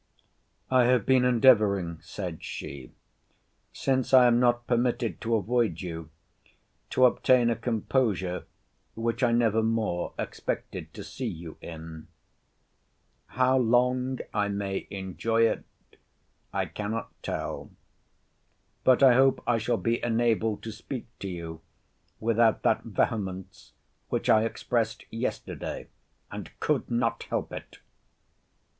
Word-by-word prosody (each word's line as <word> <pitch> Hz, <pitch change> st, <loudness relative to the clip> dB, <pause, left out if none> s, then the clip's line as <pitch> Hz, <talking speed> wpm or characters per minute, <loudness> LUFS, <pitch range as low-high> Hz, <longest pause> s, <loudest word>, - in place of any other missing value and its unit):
I 130 Hz, -1 st, +5 dB
have 125 Hz, -3 st, +3 dB
been 130 Hz, -1 st, +4 dB
endeavouring, 105 Hz, -9 st, +4 dB
said 80 Hz, +1 st, -6 dB
she, 70 Hz, -4 st, -7 dB, 0.8 s
since 130 Hz, -1 st, +1 dB
I 125 Hz, -1 st, +8 dB
am 120 Hz, -1 st, +5 dB
not 120 Hz, -1 st, +2 dB
permitted 120 Hz, -4 st, 0 dB
to 115 Hz, 0 st, +1 dB
avoid 110 Hz, -4 st, 0 dB
you, 80 Hz, -3 st, -6 dB, 0.8 s
to 130 Hz, -, +4 dB
obtain 125 Hz, -1 st, +4 dB
a -, -, +1 dB
composure 110 Hz, -5 st, -1 dB, 0.5 s
which 115 Hz, +1 st, -2 dB
I 125 Hz, -2 st, +3 dB
never 115 Hz, -2 st, +3 dB
more 110 Hz, -6 st, -1 dB
expected -, -, -4 dB
to -, -, -7 dB
see -, -, -5 dB
you 80 Hz, -1 st, -7 dB
in. 80 Hz, -1 st, -9 dB, 1.2 s
How 130 Hz, +2 st, +2 dB
long 125 Hz, +2 st, +2 dB, 0.2 s
I 105 Hz, -1 st, +1 dB
may 100 Hz, -1 st, -3 dB
enjoy 115 Hz, +4 st, +1 dB
it, -, -, -3 dB, 0.9 s
I -, -, -1 dB
cannot 110 Hz, +2 st, -4 dB
tell. -, -, -4 dB, 1.1 s
But 130 Hz, +1 st, +5 dB
I 130 Hz, -2 st, +8 dB
hope 135 Hz, +2 st, +4 dB
I 120 Hz, -1 st, +2 dB
shall 115 Hz, +2 st, 0 dB
be 115 Hz, +1 st, -1 dB
enabled 115 Hz, -2 st, +1 dB
to 110 Hz, -, -5 dB
speak 125 Hz, +3 st, -6 dB
to 100 Hz, -, -5 dB
you 85 Hz, -3 st, -6 dB, 0.6 s
without 115 Hz, 0 st, +2 dB
that -, -, +3 dB
vehemence 95 Hz, -4 st, -3 dB, 0.4 s
which -, -, -1 dB
I 110 Hz, +1 st, +5 dB
expressed 115 Hz, -2 st, -1 dB
yesterday, 115 Hz, +3 st, -4 dB, 0.4 s
and -, -, -6 dB
could -, -, 0 dB
not 120 Hz, -1 st, 0 dB
help -, -, -2 dB
it. -, -, -8 dB
115 Hz, 125 wpm, -27 LUFS, 100-120 Hz, 1.2 s, I